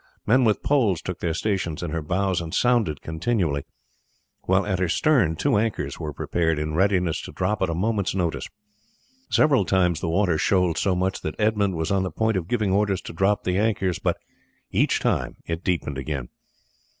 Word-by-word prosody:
Men 125 Hz, +4 st, +4 dB
with 105 Hz, -2 st, +1 dB
poles 115 Hz, -, +2 dB
took 90 Hz, +2 st, -6 dB
their 80 Hz, -2 st, -1 dB
stations 90 Hz, -4 st, -2 dB
in 85 Hz, -, -3 dB
her 80 Hz, 0 st, -2 dB
bows 95 Hz, +3 st, 0 dB
and 80 Hz, -1 st, -5 dB
sounded 120 Hz, -11 st, +1 dB
continually, 80 Hz, -4 st, -1 dB, 0.8 s
while 95 Hz, +1 st, +2 dB
at 95 Hz, -3 st, -1 dB
her 95 Hz, -2 st, +1 dB
stern 105 Hz, -, +3 dB
two 90 Hz, -, +1 dB
anchors 110 Hz, 0 st, -2 dB
were 75 Hz, -, -4 dB
prepared 80 Hz, +2 st, -1 dB
in 75 Hz, +1 st, -2 dB
readiness 90 Hz, -2 st, +1 dB
to -, -, -8 dB
drop 95 Hz, +3 st, -1 dB
at 95 Hz, -, +1 dB
a 85 Hz, -, -1 dB
moment's 100 Hz, +1 st, 0 dB
notice. 85 Hz, -4 st, -2 dB, 0.8 s
Several 140 Hz, -8 st, +4 dB
times 90 Hz, -3 st, +2 dB
the 85 Hz, -, -2 dB
water 85 Hz, -2 st, +1 dB
shoaled 90 Hz, -4 st, +2 dB
so 95 Hz, -2 st, +1 dB
much 95 Hz, +1 st, -1 dB
that 75 Hz, -, -4 dB
Edmund 105 Hz, -3 st, +1 dB
was 80 Hz, +2 st, -2 dB
on 100 Hz, -1 st, +2 dB
the 95 Hz, -, -1 dB
point 110 Hz, +6 st, 0 dB
of 90 Hz, -3 st, -2 dB
giving 110 Hz, -3 st, 0 dB
orders 100 Hz, -1 st, +1 dB
to -, -, -8 dB
drop 95 Hz, +5 st, +1 dB
the 90 Hz, +1 st, 0 dB
anchors, 95 Hz, -5 st, 0 dB
but -, -, 0 dB, 0.5 s
each -, -, +2 dB
time -, -, -1 dB
it 85 Hz, +1 st, -4 dB
deepened 75 Hz, -6 st, -1 dB
again. 65 Hz, -2 st, -4 dB
95 Hz, 190 wpm, -24 LUFS, 80-105 Hz, 0.8 s, Men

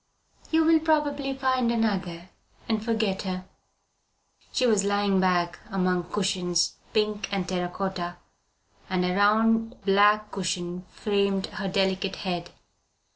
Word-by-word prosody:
"You 320 Hz, 0 st, +3 dB
will 325 Hz, 0 st, +5 dB
probably 290 Hz, -4 st, 0 dB
find 260 Hz, -3 st, +1 dB
another 185 Hz, -6 st, -2 dB, 0.4 s
and 220 Hz, -2 st, 0 dB
forget 220 Hz, -4 st, 0 dB
her." 185 Hz, -1 st, -4 dB, 1.1 s
She 255 Hz, -, +1 dB
was 215 Hz, -4 st, +3 dB
lying 200 Hz, -1 st, +2 dB
back 175 Hz, -2 st, +1 dB
among 185 Hz, -3 st, 0 dB
cushions, 180 Hz, -4 st, 0 dB
pink 210 Hz, -1 st, 0 dB
and 195 Hz, -3 st, -1 dB
terra 180 Hz, -1 st, -2 dB
cotta, 175 Hz, -2 st, -4 dB, 0.7 s
and 185 Hz, -1 st, +1 dB
a 180 Hz, -, 0 dB
round 225 Hz, +3 st, +3 dB
black 210 Hz, +2 st, +4 dB
cushion 180 Hz, -1 st, -3 dB
framed 200 Hz, -1 st, 0 dB
her 195 Hz, -, -5 dB
delicate 190 Hz, 0 st, 0 dB
head. 175 Hz, -2 st, -4 dB
195 Hz, 125 wpm, -26 LUFS, 185-220 Hz, 1.1 s, will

